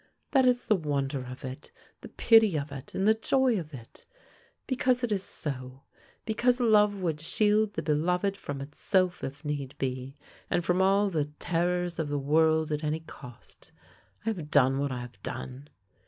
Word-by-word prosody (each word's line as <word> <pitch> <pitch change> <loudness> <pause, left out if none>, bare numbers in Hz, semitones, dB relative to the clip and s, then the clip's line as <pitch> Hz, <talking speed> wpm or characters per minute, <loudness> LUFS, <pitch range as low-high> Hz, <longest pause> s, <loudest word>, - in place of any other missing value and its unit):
That 265 -2 +4
is 245 -1 +2
the 215 - +3
wonder 140 -5 -2
of 125 +3 -8
it, 130 +3 -8 0.3
the - - -9
pity 220 -7 +4
of 145 0 -4
it, 135 0 -9
and 195 - +1
the 220 - +7
joy 245 0 +2
of 155 -3 -8
it. 120 -5 -12 0.6
Because 255 -1 +1
it 240 - 0
is 200 -2 +1
so, 130 -7 -5 0.4
because 245 +3 +1
love 210 -4 +4
would 160 -4 -2
shield 210 +5 +2
the 160 - -2
beloved 180 +6 +1
from 145 -7 -6
itself 180 +6 0
if 145 +3 -6
need 145 -2 -4
be, 130 0 -4 0.3
and 175 - 0
from 180 +2 +2
all 195 +1 +3
the 155 -4 0
terrors 175 0 -1
of 155 -2 -1
the 145 - -1
world 155 +2 +2
at 150 +1 -2
any 155 +1 -1
cost, 125 -6 -14 0.5
I - - +1
have 170 -9 -4
done 135 -2 +4
what 140 -1 -1
I 125 -1 -4
have 120 0 -11
done. 130 +3 -7
160 Hz, 180 wpm, -28 LUFS, 140-200 Hz, 0.6 s, the